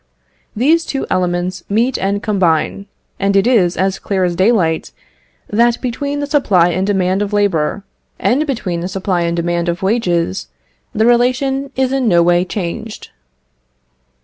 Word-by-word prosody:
These 310 Hz, +9 st, +3 dB
two 275 Hz, -, -3 dB
elements 180 Hz, 0 st, -1 dB
meet 235 Hz, +5 st, +1 dB
and 200 Hz, +1 st, -1 dB
combine, 195 Hz, -1 st, 0 dB, 0.3 s
and 200 Hz, 0 st, +1 dB
it 195 Hz, -, +4 dB
is 200 Hz, -9 st, +2 dB
as 190 Hz, 0 st, 0 dB
clear 190 Hz, -2 st, -1 dB
as 175 Hz, -1 st, 0 dB
daylight, 185 Hz, -5 st, +1 dB, 0.6 s
that 235 Hz, +3 st, +2 dB
between 280 Hz, +4 st, -3 dB
the -, -, -1 dB
supply 205 Hz, -, +3 dB
and 185 Hz, +3 st, -1 dB
demand 190 Hz, -1 st, +1 dB
of 205 Hz, 0 st, -3 dB
labour, 200 Hz, -2 st, 0 dB, 0.3 s
and 290 Hz, +5 st, +1 dB
between 205 Hz, -10 st, -2 dB
the 175 Hz, -, -3 dB
supply 190 Hz, -1 st, -1 dB
and 170 Hz, 0 st, -1 dB
demand 170 Hz, 0 st, -1 dB
of 170 Hz, +3 st, -3 dB
wages, 175 Hz, -, 0 dB, 0.4 s
the 220 Hz, -, +1 dB
relation 255 Hz, +3 st, +1 dB
is 265 Hz, 0 st, 0 dB
in 265 Hz, -3 st, 0 dB
no 170 Hz, -4 st, +4 dB
way 175 Hz, +1 st, +3 dB
changed. 205 Hz, +3 st, -6 dB
195 Hz, 150 wpm, -16 LUFS, 175-240 Hz, 0.6 s, it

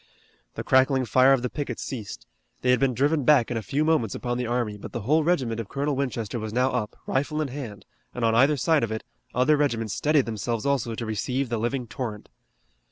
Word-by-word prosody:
The -, -, -4 dB
crackling 130 Hz, 0 st, +3 dB
fire 130 Hz, +3 st, +5 dB
of 135 Hz, -3 st, +3 dB
the 125 Hz, -, -1 dB
pickets 140 Hz, -5 st, -4 dB
ceased. 100 Hz, -, -6 dB, 0.4 s
They 125 Hz, -, +4 dB
had 125 Hz, -, +3 dB
been 135 Hz, -3 st, +1 dB
driven 145 Hz, +4 st, +2 dB
back 130 Hz, -4 st, +4 dB
in 120 Hz, -, -1 dB
a -, -, -2 dB
few 145 Hz, +7 st, -1 dB
moments 155 Hz, -10 st, +1 dB
upon 120 Hz, -1 st, -3 dB
the 125 Hz, -, -2 dB
army, 120 Hz, -3 st, -1 dB
but 105 Hz, -, -10 dB
the 120 Hz, -, -3 dB
whole 155 Hz, +9 st, +2 dB
regiment 130 Hz, -9 st, 0 dB
of 115 Hz, -, -5 dB
Colonel 140 Hz, +1 st, -1 dB
Winchester 120 Hz, -4 st, -2 dB
was 110 Hz, 0 st, -5 dB
now 125 Hz, +3 st, +2 dB
up, 105 Hz, 0 st, -2 dB
rifle 145 Hz, +3 st, -1 dB
in 150 Hz, -3 st, -1 dB
hand, 125 Hz, -7 st, -7 dB, 0.3 s
and 125 Hz, -2 st, -2 dB
on 115 Hz, -, +3 dB
either 135 Hz, +6 st, +4 dB
side 155 Hz, +2 st, +2 dB
of 115 Hz, -, -2 dB
it, 110 Hz, -, -4 dB, 0.3 s
other 130 Hz, +5 st, +4 dB
regiments 115 Hz, -8 st, 0 dB
steadied 150 Hz, -2 st, +2 dB
themselves 115 Hz, +1 st, -3 dB
also 130 Hz, -5 st, 0 dB
to 115 Hz, -, -4 dB
receive 125 Hz, +4 st, -2 dB
the 115 Hz, -2 st, -1 dB
living 120 Hz, +3 st, -1 dB
torrent. 110 Hz, -2 st, -6 dB
125 Hz, 225 wpm, -25 LUFS, 115-140 Hz, 0.4 s, fire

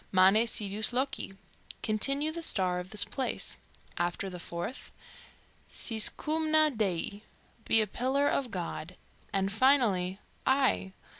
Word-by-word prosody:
"Mane 195 Hz, +5 st, +5 dB
sidus 210 Hz, 0 st, +2 dB
loci" 255 Hz, -6 st, -2 dB, 0.5 s
(Continue 275 Hz, +8 st, 0 dB
the 335 Hz, +1 st, -6 dB
star 185 Hz, -, +3 dB
of 180 Hz, +1 st, -8 dB
this 205 Hz, 0 st, +4 dB
place); 255 Hz, +5 st, -3 dB, 0.4 s
after 175 Hz, +2 st, -2 dB
the 180 Hz, -, -8 dB
fourth, 170 Hz, +9 st, -6 dB, 0.8 s
"Sis 220 Hz, -2 st, +4 dB
coumna 310 Hz, 0 st, +1 dB
Dei" 200 Hz, -1 st, -2 dB, 0.4 s
(Be 225 Hz, -, +4 dB
a -, -, +1 dB
pillar 260 Hz, +7 st, -1 dB
of 270 Hz, -3 st, -1 dB
God); 180 Hz, -2 st, -6 dB, 0.4 s
and 195 Hz, 0 st, -1 dB
finally, 205 Hz, -6 st, +2 dB, 0.2 s
"I! 95 Hz, -, +1 dB
215 Hz, 125 wpm, -29 LUFS, 185-265 Hz, 0.8 s, Mane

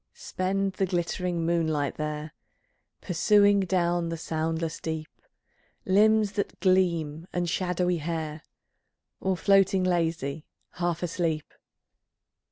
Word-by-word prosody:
Spend 195 Hz, +1 st, -2 dB
the 190 Hz, -, 0 dB
glittering 175 Hz, -1 st, -1 dB
moonlight 160 Hz, -4 st, 0 dB
there 150 Hz, 0 st, -4 dB, 0.7 s
Pursuing 205 Hz, +3 st, +4 dB
down 175 Hz, -3 st, +1 dB
the 165 Hz, -, -3 dB
soundless 160 Hz, 0 st, -2 dB
deep 160 Hz, -1 st, -4 dB, 0.8 s
Limbs 210 Hz, +2 st, +4 dB
that 200 Hz, -1 st, -3 dB
gleam 170 Hz, -4 st, +1 dB
and 175 Hz, 0 st, -1 dB
shadowy 180 Hz, 0 st, 0 dB
hair, 160 Hz, -1 st, -4 dB, 0.8 s
Or 190 Hz, -1 st, 0 dB
floating 195 Hz, 0 st, +4 dB
lazy, 165 Hz, -4 st, -1 dB, 0.2 s
half 175 Hz, -1 st, -2 dB
asleep. 165 Hz, -3 st, -2 dB
175 Hz, 100 wpm, -27 LUFS, 160-185 Hz, 0.8 s, Pursuing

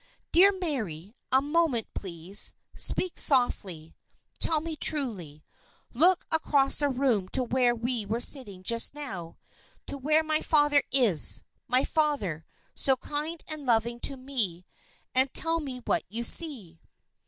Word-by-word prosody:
"Dear 380 Hz, +4 st, +6 dB
Mary, 225 Hz, -, -5 dB, 0.2 s
a 265 Hz, +1 st, +4 dB
moment, 295 Hz, -6 st, 0 dB
please. 185 Hz, +1 st, 0 dB, 0.2 s
Speak 370 Hz, -, +1 dB
softly. 190 Hz, -, +1 dB, 0.4 s
Tell 320 Hz, -2 st, +2 dB
me 320 Hz, +1 st, -6 dB
truly. 200 Hz, -, +1 dB, 0.5 s
Look 345 Hz, +8 st, +2 dB
across 285 Hz, -4 st, +1 dB
the 290 Hz, -1 st, +1 dB
room 250 Hz, -8 st, -1 dB
to 260 Hz, -, 0 dB
where 245 Hz, 0 st, +1 dB
we 235 Hz, -2 st, -4 dB
were 225 Hz, +3 st, -2 dB
sitting 210 Hz, -8 st, +1 dB
just 230 Hz, +7 st, +3 dB
now 195 Hz, -, -7 dB, 0.5 s
to 280 Hz, -, -1 dB
where 305 Hz, +4 st, +1 dB
my 310 Hz, 0 st, -1 dB
father 295 Hz, -2 st, +2 dB
is 230 Hz, -, +4 dB, 0.2 s
my 255 Hz, +2 st, +1 dB
father, 275 Hz, -, -2 dB, 0.3 s
so 265 Hz, -, +2 dB
kind 305 Hz, +5 st, -6 dB
and 310 Hz, -3 st, -8 dB
loving 235 Hz, 0 st, 0 dB
to 270 Hz, -, 0 dB
me 230 Hz, -10 st, -4 dB, 0.5 s
and 260 Hz, +1 st, +3 dB
tell 330 Hz, 0 st, +2 dB
me 265 Hz, -5 st, -7 dB
what -, -, 0 dB
you 230 Hz, +4 st, -5 dB
see." 235 Hz, -, +2 dB
260 Hz, 140 wpm, -27 LUFS, 210-300 Hz, 0.5 s, Dear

